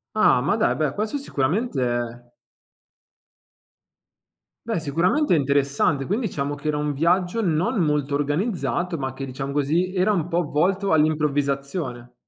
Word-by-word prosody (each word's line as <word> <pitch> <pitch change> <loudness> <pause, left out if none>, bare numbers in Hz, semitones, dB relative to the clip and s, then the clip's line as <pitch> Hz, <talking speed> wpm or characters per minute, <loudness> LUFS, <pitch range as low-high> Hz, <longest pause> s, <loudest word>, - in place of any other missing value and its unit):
Ah, 215 -12 +4
ma 155 +10 +1
dai, 220 - +1
beh, 150 -3 0
questo 215 - -2
sicuramente 180 - -1
è 120 0 -3 2.4
beh, 225 -6 -1
sicuramente 170 - +1
è - - +5
interessante. 140 0 +1
Quin 205 - 0
diciamo 145 - -2
che 145 +2 -7
era 150 - +1
un 150 0 -1
viaggio 175 +8 +1
non 185 +5 0
molto 150 -3 +1
organizzato 175 +3 -1
ma 130 -2 -3
che, 135 +1 -6
diciamo 135 +1 -5
così, 160 +6 0
era 185 +3 +3
un 175 -5 0
po' 175 0 0
volto 185 +7 0
all'improvvisazione. 140 -4 0
150 Hz, 140 wpm, -23 LUFS, 140-185 Hz, 2.4 s, è